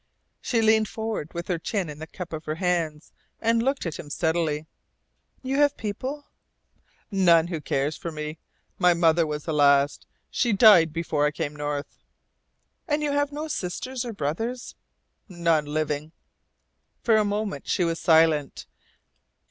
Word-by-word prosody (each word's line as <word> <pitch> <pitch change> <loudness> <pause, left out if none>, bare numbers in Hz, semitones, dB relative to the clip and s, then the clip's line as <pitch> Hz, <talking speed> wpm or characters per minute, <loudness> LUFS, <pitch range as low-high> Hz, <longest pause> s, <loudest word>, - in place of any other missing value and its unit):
She 230 -3 0
leaned 220 0 +4
forward, 220 -9 -4
with 170 0 -4
her 180 -3 -1
chin 195 +1 -2
in 150 0 -8
the 160 - -7
cup 175 0 -8
of 155 0 -6
her 155 - -2
hands, 165 -3 -1 0.3
and 230 0 +2
looked 270 0 -1
at 165 - -4
him 145 - -8
steadily. 160 -1 -1 0.8
"You 265 +1 -1
have 290 -1 +3
people?" 260 +7 -5 0.9
"None 170 -4 +4
who 165 -4 -4
cares 145 +1 -1
for 170 - -5
me. 150 0 -6 0.4
My 180 -2 +5
mother 165 -1 +3
was 150 -1 -4
the 160 - -3
last. 140 -1 +3 0.2
She 235 -3 +1
died 195 -6 +7
before 155 -2 0
I - - +2
came 145 0 -4
North." 145 -1 -4 0.9
"And 300 -1 0
you 295 - 0
have 285 0 0
no 300 +2 -4
sisters 255 - -4
or 240 - -5
brothers?" 225 - -3 0.6
"None 170 -4 +1
living." 150 +1 -2 0.9
For 225 -2 +4
a 215 - +4
moment 205 0 -3
she 180 - +1
was 165 -1 -1
silent. 160 -3 +3
170 Hz, 155 wpm, -25 LUFS, 155-220 Hz, 0.9 s, died